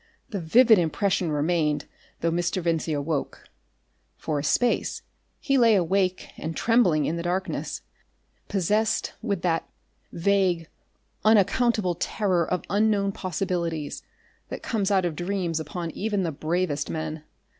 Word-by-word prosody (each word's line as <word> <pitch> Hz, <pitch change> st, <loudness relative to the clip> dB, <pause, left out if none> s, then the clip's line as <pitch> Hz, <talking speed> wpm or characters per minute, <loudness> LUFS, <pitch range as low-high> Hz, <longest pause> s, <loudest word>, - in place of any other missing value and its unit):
The 200 Hz, -, -3 dB
vivid 220 Hz, +6 st, +6 dB
impression 175 Hz, +1 st, 0 dB
remained 150 Hz, -1 st, +1 dB, 0.4 s
though 165 Hz, -, +1 dB
Mr. 175 Hz, +2 st, 0 dB
Vincey 165 Hz, -2 st, 0 dB
awoke. 145 Hz, 0 st, -3 dB, 0.7 s
For 150 Hz, -2 st, -2 dB
a -, -, -4 dB
space 235 Hz, +11 st, +1 dB, 0.4 s
he 275 Hz, -1 st, +2 dB
lay 230 Hz, -3 st, +6 dB
awake 185 Hz, 0 st, +1 dB
and 160 Hz, +1 st, -5 dB
trembling 190 Hz, -, +3 dB
in 165 Hz, -, -1 dB
the -, -, -3 dB
darkness, 180 Hz, +2 st, -3 dB, 0.6 s
possessed 210 Hz, +3 st, 0 dB
with 200 Hz, -6 st, -2 dB
that 165 Hz, -2 st, 0 dB, 0.4 s
vague, 180 Hz, -2 st, +1 dB, 0.6 s
unaccountable 215 Hz, -2 st, +3 dB
terror 180 Hz, -1 st, 0 dB
of 180 Hz, -, 0 dB
unknown 205 Hz, 0 st, +2 dB
possibilities 175 Hz, -5 st, -3 dB, 0.5 s
that -, -, -6 dB
comes 210 Hz, -4 st, 0 dB
out 190 Hz, -3 st, +2 dB
of 170 Hz, -3 st, -2 dB
dreams 175 Hz, -2 st, -2 dB
upon 165 Hz, +2 st, -5 dB
even 205 Hz, +2 st, -1 dB
the 165 Hz, -, -1 dB
bravest 155 Hz, +1 st, -1 dB
men. 155 Hz, -1 st, -4 dB
180 Hz, 130 wpm, -25 LUFS, 160-200 Hz, 0.7 s, vivid